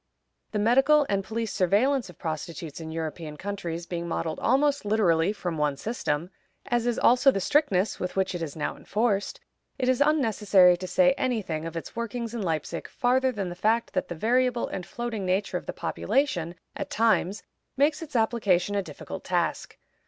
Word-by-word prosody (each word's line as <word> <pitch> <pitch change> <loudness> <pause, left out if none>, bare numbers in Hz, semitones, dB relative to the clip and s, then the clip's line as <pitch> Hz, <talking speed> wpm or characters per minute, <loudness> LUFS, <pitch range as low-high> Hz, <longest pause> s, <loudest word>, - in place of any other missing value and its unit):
The 215 - -2
medical 270 +7 +4
and 195 -1 +1
police 225 +1 -3
surveillance 215 +7 +2
of 180 - -13
prostitutes 160 0 -5
in 160 0 -6
European 160 -1 -5
countries 175 -4 -4
being 170 -1 -4
modeled 165 -1 -2
almost 280 +3 +2
literally 200 -5 +2
from 175 -6 -4
one 145 -2 +1
system, 175 - -2 0.3
as 240 -1 0
is 240 - 0
also 250 +3 +5
the 230 - +2
strictness 200 - +1
with 180 - -4
which 190 0 0
it 175 - -4
is 155 -4 -4
now 155 - -3
enforced, 205 -2 -1 0.4
it 255 -2 -1
is 255 +1 +2
unnecessary 215 - +4
to 185 +1 -6
say 270 +9 +4
any 245 -4 0
thing 160 -2 -4
of 165 0 -6
its 165 - -7
workings 235 0 -4
in 235 - -3
Leipzig 165 -2 -3
farther 260 +1 +1
than 200 -6 -3
the - - -5
fact 220 +5 +1
that - - -1
the 175 - -5
variable 245 +5 +1
and 180 - -5
floating 235 -4 -4
nature 190 +2 0
of - - -9
the - - -1
population, 180 - -1 0.2
at - - -5
times, 215 -3 +1 0.3
makes 290 +4 +2
its 305 -4 -9
application 205 -5 +2
a 200 - +1
difficult 185 - -8
task. - - -1
205 Hz, 180 wpm, -27 LUFS, 175-240 Hz, 0.4 s, also